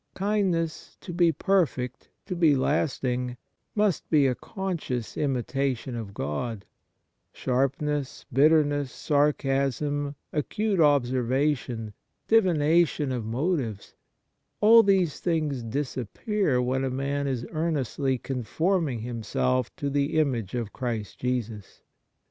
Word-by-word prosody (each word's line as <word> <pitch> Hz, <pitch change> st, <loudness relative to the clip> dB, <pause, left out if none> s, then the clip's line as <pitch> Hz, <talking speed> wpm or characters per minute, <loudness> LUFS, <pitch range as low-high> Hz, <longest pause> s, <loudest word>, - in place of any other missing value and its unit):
Kindness 190 Hz, -5 st, -1 dB
to 175 Hz, -, -7 dB
be 170 Hz, -1 st, +4 dB
perfect, 145 Hz, -7 st, 0 dB, 0.2 s
to 185 Hz, -, -4 dB
be 165 Hz, -4 st, +4 dB
lasting, 125 Hz, -3 st, 0 dB, 0.4 s
must 210 Hz, -4 st, +1 dB
be 150 Hz, -3 st, +4 dB
a 130 Hz, -, +3 dB
conscious 165 Hz, -, -4 dB
imitation 135 Hz, -2 st, -1 dB
of 105 Hz, -4 st, -6 dB
God: 100 Hz, +8 st, -3 dB, 0.7 s
sharpness, 135 Hz, +2 st, -1 dB
bitterness, 145 Hz, -1 st, +3 dB
sarcasm, 145 Hz, 0 st, 0 dB, 0.2 s
acute 205 Hz, +6 st, -1 dB
observation, 130 Hz, -4 st, +1 dB, 0.3 s
divination 165 Hz, -7 st, +3 dB
of 120 Hz, -4 st, -3 dB
motives 125 Hz, -, -2 dB, 0.3 s
— -, -, -51 dB
all 225 Hz, +2 st, +8 dB
these 190 Hz, -7 st, +2 dB
things 155 Hz, -6 st, -1 dB
disappear 135 Hz, -, -1 dB
when 130 Hz, +2 st, 0 dB
a 135 Hz, -, 0 dB
man 140 Hz, +2 st, -2 dB
is 125 Hz, -3 st, -2 dB
earnestly 145 Hz, -4 st, -1 dB
conforming 140 Hz, -, -1 dB
himself 120 Hz, +2 st, -1 dB
to 145 Hz, -, -3 dB
the 140 Hz, +2 st, 0 dB
image 125 Hz, -9 st, 0 dB
of 115 Hz, -4 st, -3 dB
Christ 115 Hz, -6 st, -4 dB
Jesus. 115 Hz, -6 st, -4 dB
140 Hz, 110 wpm, -26 LUFS, 125-160 Hz, 0.7 s, all